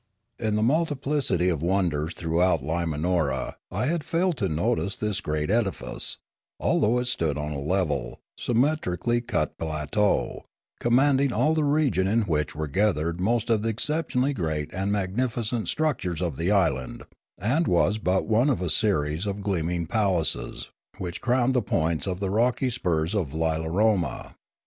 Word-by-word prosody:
In 110 -2 0
the 105 - +1
multiplicity 140 - +1
of 80 -5 -1
wonders 85 -3 0
throughout 85 -2 +1
Limanora 80 -2 -1 0.2
I 100 +7 -1
had 160 +2 0
failed 175 +2 +1
to 100 -6 0
notice 100 +5 0
this 105 -2 -2
great 75 +3 -1
edifice, 110 -5 -2 0.4
although 115 +4 +2
it 125 - 0
stood 80 - -1
on 75 0 -3
a 70 -2 -4
level, 75 -6 -1 0.2
symmetrically 120 - 0
cut 120 - -2
plateau, 80 +6 0 0.3
command 135 +3 +3
ing 140 -2 +2
all 155 +5 +2
the 155 -1 +1
region 145 -10 +2
in 110 +4 +2
which 75 -6 -1
were 80 0 -2
gathered 85 -1 0
most 115 +3 +1
of 110 -2 +3
the 115 - 0
exceptionally 140 +2 0
great 80 - -2
and 95 +3 -1
magnificent 110 +3 -1
structures 140 - -1
of 85 -5 -2
the 85 +3 0
island, 80 -11 +1 0.3
and 135 - +1
was 95 +5 +2
but 95 -2 +1
one 115 +6 +3
of 135 - +1
a 90 -3 -1
series 80 -1 +1
of 100 0 -3
gleaming 90 -3 -1
palaces 90 - -1 0.3
which 90 -1 -5
crowned 125 +1 +2
the 125 - +2
points 80 -3 0
of 90 -1 -2
the 100 -2 -2
rocky 125 +4 +1
spurs 85 -6 0
of 85 -9 -2
Lila 80 0 0
roma. 95 - 0
95 Hz, 160 wpm, -26 LUFS, 80-120 Hz, 0.4 s, command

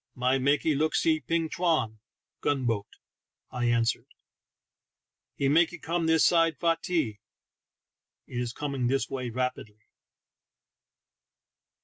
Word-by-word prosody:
"My 130 +1 +1
makee 145 +4 +2
look 155 +3 0
see 160 -1 +2
ping 165 +1 -1
chwan" 155 -10 0 0.4
(gun 135 -3 0
boat), 110 -4 -1 0.6
I 125 -1 -2
answered. 115 -1 +1 0.7
" - - -63
He 140 - +1
makee 165 +4 +3
come 165 0 -2
this 160 -1 +4
side 165 -1 +3
fai 165 -1 +2
tee" 130 -13 -1 0.6
— - - -64 0.3
it 120 - -5
is 120 -1 -3
coming 135 -2 -2
this 135 +2 0
way 130 -2 -3
rapidly. 115 -3 -4
140 Hz, 125 wpm, -28 LUFS, 120-160 Hz, 0.7 s, this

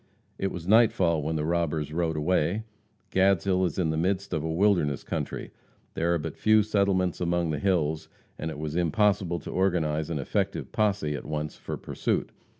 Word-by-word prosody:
It 95 - -1
was 85 -1 -7
nightfall 95 -7 +4
when 80 +2 -2
the 75 -1 -1
robbers 80 -3 -1
rode 80 -1 0
away. 90 +5 +1 0.5
Gadshill 95 -1 +3
is 80 - -6
in 85 -4 +1
the 80 - -1
midst 95 +3 -1
of 80 -2 -1
a 80 - -2
wilderness 85 -6 +2
country. - - -4 0.4
There 85 +1 0
are - - +2
but 75 - -5
few 110 0 +4
settlements 100 -4 +1
among 85 -1 +1
the 75 - -2
hills, 80 -5 0 0.3
and 80 - -3
it 80 - -6
was 75 0 -4
impossible 90 0 +2
to - - -7
organize 80 -5 0
an 85 - -2
effective 70 - -2
posse 100 -8 +1
at 70 - -6
once 75 0 -3
for - - -6
pursuit. - - -2
85 Hz, 180 wpm, -27 LUFS, 80-95 Hz, 0.5 s, nightfall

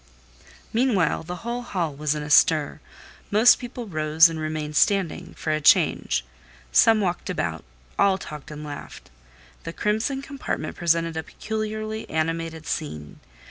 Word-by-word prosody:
Meantime 220 -9 +2
the 180 - -4
whole 240 +1 -2
hall 175 -10 -2
was 150 +1 -1
in 150 - -4
a 150 - -7
stir; 155 0 +4 0.5
most 220 +4 +6
people 245 -1 -7
rose 155 -2 +4
and 165 -1 -5
remained 155 -1 -4
standing, 195 -2 +1
for 155 - -3
a 155 0 0
change; - - +3 0.5
some 220 - +5
walked 180 -2 -2
about, 85 - -2 0.4
all 195 -1 +4
talked 150 -5 -9
and 150 0 -8
laughed. 145 -1 -9 0.5
The 165 - -6
crimson 220 +8 -1
compartment 275 - -4
presented 165 -1 0
a - - -1
peculiarly 215 +3 -5
animated 160 0 -2
scene. 75 - -5
165 Hz, 140 wpm, -24 LUFS, 155-215 Hz, 0.5 s, most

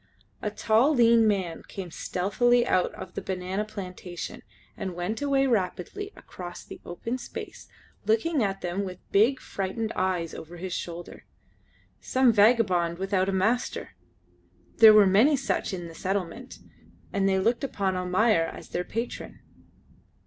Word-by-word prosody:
A 210 - -1
tall, 225 +7 +3
lean 230 -2 +5
man 190 -5 -1
came 185 -3 -7
stealthily 240 +9 +1
out 185 - +2
of 185 - -9
the - - -4
banana 190 +2 -3
plantation, 180 -4 -7 0.3
and 185 -2 -5
went 180 +8 -3
away 275 -1 +2
rapidly 230 - -1
across 175 -1 -9
the - - -11
open 230 +8 -4
space - - -8 0.4
looking 260 +7 +2
at 195 -2 -1
them 180 +3 -2
with 185 -2 -6
big, 235 +7 +4
frightened 205 +3 -3
eyes 180 -3 -1
over 170 +2 -9
his 180 +1 -5
shoulder. 170 -1 -6 0.7
Some 255 -2 +3
vagabond 200 -6 +3
without 190 0 0
a - - +1
master; 215 +7 0 0.9
there 220 -1 +10
were 210 -1 +8
many 225 +10 +5
such 270 - -1
in 175 -3 -5
the 165 - -10
settlement, 195 +8 -4 0.6
and 195 0 +2
they 190 - +2
looked 230 +8 +1
upon 195 -8 -1
Almayer 185 +1 +2
as - - -9
their 180 - -2
patron. 230 +6 -5
195 Hz, 145 wpm, -27 LUFS, 180-230 Hz, 0.9 s, there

